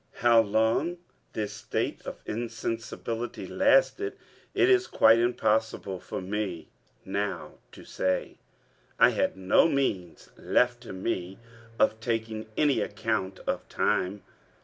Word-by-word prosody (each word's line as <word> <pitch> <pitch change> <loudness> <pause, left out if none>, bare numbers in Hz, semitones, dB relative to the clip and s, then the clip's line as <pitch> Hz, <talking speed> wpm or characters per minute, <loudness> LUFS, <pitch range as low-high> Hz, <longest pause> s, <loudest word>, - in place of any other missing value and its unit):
How 115 -1 +7
long 110 +11 +1 0.4
this 105 -2 -3
state - - -3
of - - -7
insensibility 115 +1 -4
lasted, 455 -5 +2 0.4
it 370 - +4
is 380 -1 +4
quite 115 +1 +5
impossible 110 -5 0
for - - -6
me 95 -3 -4 0.4
now 100 +2 -3
to - - -12
say. 95 0 -2 0.6
I - - +7
had - - 0
no 95 - +4
means 95 - -2
left 120 -1 +1
to 120 - -9
me 95 0 -3 0.4
of 110 - +2
taking 110 -1 -3
any 145 -3 +3
account 100 -3 -2
of - - -3
time. 95 +2 0
110 Hz, 120 wpm, -28 LUFS, 95-120 Hz, 0.6 s, How